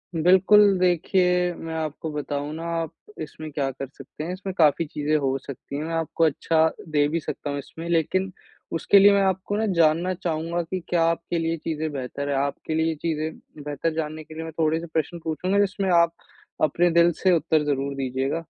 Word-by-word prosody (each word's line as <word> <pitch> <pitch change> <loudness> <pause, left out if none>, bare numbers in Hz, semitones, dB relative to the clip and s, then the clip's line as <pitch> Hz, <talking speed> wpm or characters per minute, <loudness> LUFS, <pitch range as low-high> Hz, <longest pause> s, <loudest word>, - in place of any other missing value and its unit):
बिल्कुल, 190 +4 +5
देखिए 180 0 +2
मैं 165 0 -7
आपको 160 0 -4
बताऊँ 145 0 -3
ना, 165 +1 -6
आप 165 -2 -2 0.3
इसमें 155 +1 -7
क्या 140 -2 -1
कर 135 +1 -6
सकते 140 +2 -9
हैं, 175 +3 -3
इसमें 190 0 -5
काफ़ी 160 +1 +4
चीज़े 150 +1 -1
हो 135 -2 +1
सकती 140 +1 -9
हैं। 150 - -3
मैं 165 +1 -4
आपको 165 0 -1
अच्छा 160 +1 +2 0.2
दे 145 -1 +3
भी 165 +3 -1
सकता 145 - -5
हूँ 140 0 -2
इसमें, 165 +4 -9
लेकिन 185 +3 +1 0.5
उसके 200 +5 +5
लिए 200 +1 +8
मैं 200 - +3
आपको 190 +2 0
ना 220 - +1
जानना 170 +2 +3
चाहूँगा 170 -1 -2
की 185 +3 -4
क्या 170 -2 +2
आपके 170 +1 -2
लिए 165 0 -1
चीज़ें 155 0 -3
बेहतर 140 +1 -4
हैं। 140 - 0
आपके 140 +3 -2
लिए 160 0 +2
ये 160 - -2
चीज़ें 155 -1 -5
बेहतर 150 +2 -2
जानने 155 0 -4
के 155 - -13
लिए 160 +1 -6
मैं 160 - -6
थोड़े 160 0 +2
से 170 - -7
प्रश्न 165 +2 -1
पूछूँगा 180 +5 0
जिसमें 200 -1 +1
आप, 170 -1 +4 0.5
अपने 175 +3 +3
दिल 170 +1 +5
से 185 - +4
उत्तर 155 -1 +2
ज़रूर 140 -1 -1
दीजियेगा। 135 +4 -2
160 Hz, 200 wpm, -24 LUFS, 150-175 Hz, 0.5 s, लिए